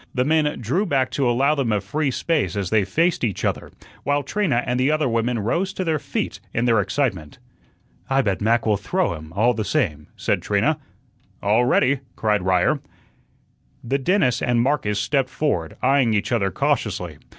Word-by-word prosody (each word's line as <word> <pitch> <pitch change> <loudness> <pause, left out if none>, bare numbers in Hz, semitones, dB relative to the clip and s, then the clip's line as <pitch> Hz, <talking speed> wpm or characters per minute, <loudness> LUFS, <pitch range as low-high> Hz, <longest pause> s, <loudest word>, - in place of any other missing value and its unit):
The 125 0 +1
men 155 0 +1
drew 165 - 0
back 135 -5 +1
to 135 -4 +1
allow 135 +5 +3
them 135 -6 -1
a 105 - +2
free 140 +10 -1
space 150 0 -1
as 100 -3 -2
they 105 -3 +3
faced 165 - +1
each 105 -6 -1
other, - - -2 0.3
while 145 +1 +1
Trina 140 - 0
and 125 0 -1
the 130 +2 +2
other 155 -1 +1
women 115 +1 0
rose 170 - -1
to 190 - -3
their 160 -3 0
feet - - -4 0.2
in 115 - +1
their 115 -3 +3
excitement. 95 - -2 0.7
"I 135 0 +3
bet 100 -4 -1
Mac 115 +2 +2
will 105 -2 +2
throw 180 - -1
him, 80 -1 -9
all 115 +5 +3
the 110 -1 -2
same," 75 -7 -1
said - - -1
Trina. - - +1 0.6
"All 110 +4 +3
ready!" 130 +2 +3 0.2
cried 105 -2 +1
Ryer. 90 -1 +2 1.0
The 135 +4 -1
dentist 155 - +2
and 120 -1 +1
Marcus 115 -5 +1
stepped 130 +4 0
forward, 90 - -2
eyeing 130 -4 +3
each 105 - -1
other 105 -5 +1
cautiously. 90 - -1
125 Hz, 185 wpm, -22 LUFS, 105-145 Hz, 1.0 s, allow